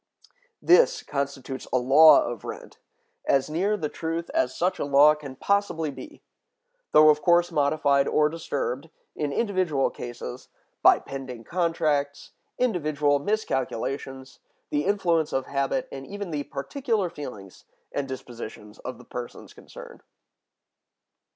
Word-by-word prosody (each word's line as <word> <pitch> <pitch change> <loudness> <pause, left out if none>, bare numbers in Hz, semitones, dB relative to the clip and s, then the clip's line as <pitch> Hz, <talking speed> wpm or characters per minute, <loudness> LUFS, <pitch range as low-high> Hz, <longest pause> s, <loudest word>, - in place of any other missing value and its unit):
This 485 +8 +5
constitutes 140 -2 -4
a - - +3
law 140 +6 +7
of 120 -3 -5
rent, - - -9 0.5
as 135 +1 +2
near 195 +6 +1
the 155 -6 -2
truth 165 +2 -4
as 325 0 0
such 180 +2 0
a - - 0
law 145 +1 +6
can 145 -3 -9
possibly 165 -3 0
be; 130 -1 -11 0.7
though 155 0 +7
of 150 0 +3
course 175 +1 +3
modified 140 -1 +2
or 150 0 +3
disturbed, 150 -2 -4 0.3
in 150 -2 -2
individual 185 - 0
cases, 120 +1 -8 0.3
by - - +7
pending 130 -4 -8
contracts, 155 -4 -1 0.3
individual 150 - +1
miscalculations, 135 - -3 0.3
the 145 0 0
influence 175 -6 +1
of 135 - 0
habit, 140 - -1
and 135 0 -8
even 200 -3 -6
the 145 -2 -3
particular 225 - -2
feelings 125 - -9 0.3
and 140 -1 -3
dispositions 120 -5 -9
of 130 -2 -7
the 125 - -15
persons 120 -1 -8
concerned. - - -13
145 Hz, 130 wpm, -26 LUFS, 135-170 Hz, 0.7 s, law